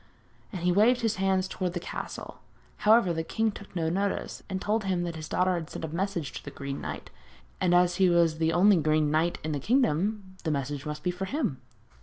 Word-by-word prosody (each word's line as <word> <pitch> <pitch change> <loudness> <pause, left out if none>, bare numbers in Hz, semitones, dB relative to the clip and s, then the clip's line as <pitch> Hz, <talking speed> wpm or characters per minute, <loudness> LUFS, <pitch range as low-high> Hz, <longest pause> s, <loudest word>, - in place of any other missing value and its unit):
And 185 -5 -5
he 180 - +3
waved 225 +7 +4
his 225 -2 0
hand 190 -1 +1
towards 185 -1 -3
the - - -1
castle. - - -7 0.4
However, 210 -4 +4
the 165 - -1
king 220 +6 0
took 200 -2 -12
no 165 -2 0
notice, 195 +4 -2
and 190 -1 -2
told 210 +3 0
him 185 -2 0
that 170 -1 -4
his 155 -1 -7
daughter 185 0 +2
had 170 -3 -3
sent - - -5
a - - -6
message 170 -2 -2
to - - -7
the - - -7
Green 140 0 -6
Knight, - - -6 0.5
and 175 -1 +3
as 175 0 +3
he 190 -2 +5
was 170 -2 +3
the 160 0 +2
only 190 +3 +5
Green 155 -1 +2
Knight 165 +3 +1
in 155 - -2
the 145 - -1
kingdom 205 - 0
this 160 - 0
message 140 0 -3
must 150 0 -5
be 180 - +1
for 180 +2 -4
him. 245 - -2
180 Hz, 225 wpm, -28 LUFS, 160-195 Hz, 0.5 s, he